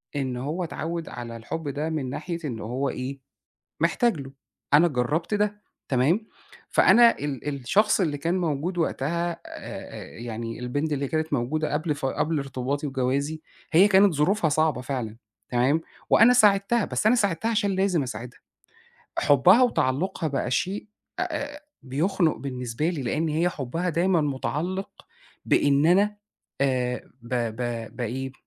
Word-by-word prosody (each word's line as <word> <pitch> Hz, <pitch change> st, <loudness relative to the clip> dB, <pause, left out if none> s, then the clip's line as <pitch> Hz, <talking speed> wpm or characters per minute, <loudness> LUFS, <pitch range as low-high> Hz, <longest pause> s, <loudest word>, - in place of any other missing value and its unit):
إن 130 Hz, -3 st, -2 dB
هو 150 Hz, +8 st, -3 dB
اتعوّد 165 Hz, 0 st, -4 dB
على 120 Hz, -1 st, -7 dB
الحُب 150 Hz, +7 st, -5 dB
ده 145 Hz, +3 st, -2 dB
من 150 Hz, -5 st, -2 dB
ناحية 170 Hz, +5 st, -4 dB
إن 120 Hz, -6 st, -4 dB
هو 125 Hz, +6 st, -2 dB
إيه، 135 Hz, +2 st, -5 dB, 0.6 s
محتاج 240 Hz, -8 st, +2 dB
له، 135 Hz, 0 st, -9 dB, 0.4 s
أنا 160 Hz, +4 st, +7 dB
جرّبت 150 Hz, -, -1 dB
ده، 210 Hz, 0 st, 0 dB, 0.3 s
تمام، 155 Hz, -, +2 dB, 0.4 s
فأنا 235 Hz, 0 st, +6 dB
ال 145 Hz, -2 st, -4 dB
الشخص 150 Hz, -, +2 dB
اللي 155 Hz, -5 st, 0 dB
كان 170 Hz, +6 st, 0 dB
موجود 170 Hz, +1 st, -1 dB
وقتها 170 Hz, +2 st, 0 dB
آآ 165 Hz, -, -7 dB
آآ -, -, -9 dB
يعني 115 Hz, 0 st, -5 dB
البنت 145 Hz, +5 st, -2 dB
اللي 140 Hz, 0 st, -1 dB
كانت 155 Hz, +1 st, -1 dB
موجودة 145 Hz, +5 st, -1 dB
قبل 150 Hz, 0 st, 0 dB
ف 145 Hz, -, -5 dB
قبل 155 Hz, +4 st, 0 dB
ارتباطي 135 Hz, +2 st, -3 dB
وجوازي، 140 Hz, +4 st, -1 dB, 0.3 s
هي 185 Hz, +6 st, +7 dB
كانت 195 Hz, -1 st, +5 dB
ظروفها 160 Hz, +3 st, +2 dB
صعبة 150 Hz, -3 st, +1 dB
فعلًا، 120 Hz, -5 st, -4 dB, 0.3 s
تمام، 130 Hz, +6 st, +2 dB, 0.3 s
وأنا 235 Hz, +3 st, +7 dB
ساعدتها، 210 Hz, -1 st, +4 dB
بس -, -, -2 dB
أنا 245 Hz, -, +5 dB
ساعدتها 205 Hz, 0 st, +1 dB
عشان 205 Hz, -3 st, +1 dB
لازم 190 Hz, -5 st, +2 dB
أساعدها. 125 Hz, -1 st, -7 dB, 0.8 s
حُبها 175 Hz, -, +6 dB
وتعلّقها 170 Hz, -, +1 dB
بقى 135 Hz, -3 st, -2 dB
شيء 190 Hz, +10 st, -1 dB, 0.3 s
أ -, -, +1 dB, 0.3 s
أ -, -, -12 dB, 0.2 s
بيخنُق 160 Hz, +5 st, +1 dB
بالنسبة 125 Hz, +2 st, -3 dB
لي، 165 Hz, -6 st, -2 dB
لإن 155 Hz, +7 st, -1 dB
هي 160 Hz, +3 st, +1 dB
حُبّها 165 Hz, +4 st, -3 dB
دايمًا 175 Hz, +1 st, +2 dB
مُتعلّق 155 Hz, +6 st, -2 dB, 0.5 s
بإن 145 Hz, +2 st, +3 dB
أنا 205 Hz, +4 st, +4 dB, 0.4 s
آآ 125 Hz, -2 st, 0 dB
ب 120 Hz, -, -12 dB
ب 115 Hz, -1 st, -3 dB
بإيه، 130 Hz, +2 st, -3 dB
150 Hz, 150 wpm, -25 LUFS, 130-180 Hz, 0.8 s, أنا